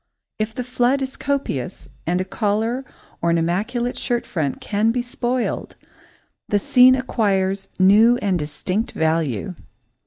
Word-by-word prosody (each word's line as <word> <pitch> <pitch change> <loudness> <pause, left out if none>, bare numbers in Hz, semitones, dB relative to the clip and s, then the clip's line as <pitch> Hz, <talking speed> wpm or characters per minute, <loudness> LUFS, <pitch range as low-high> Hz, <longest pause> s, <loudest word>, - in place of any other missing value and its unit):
If 215 +1 -2
the 250 - -3
flood 250 +2 +1
is 265 0 -5
copious 275 - -3 0.2
and 175 +2 +1
a 185 - -1
collar 215 +5 -1 0.4
or 170 - +1
an 170 - +3
immaculate 215 +9 -1
shirt 240 -2 -1
front 150 -6 -2
can 215 +2 0
be 245 +1 -1
spoiled, 245 0 -2 0.7
the 205 - +3
scene 250 +5 +6
acquires 195 -6 0
new 215 +6 +6
and 195 -6 0
distinct 180 +8 -3
value. 160 - 0
210 Hz, 135 wpm, -21 LUFS, 185-245 Hz, 0.7 s, scene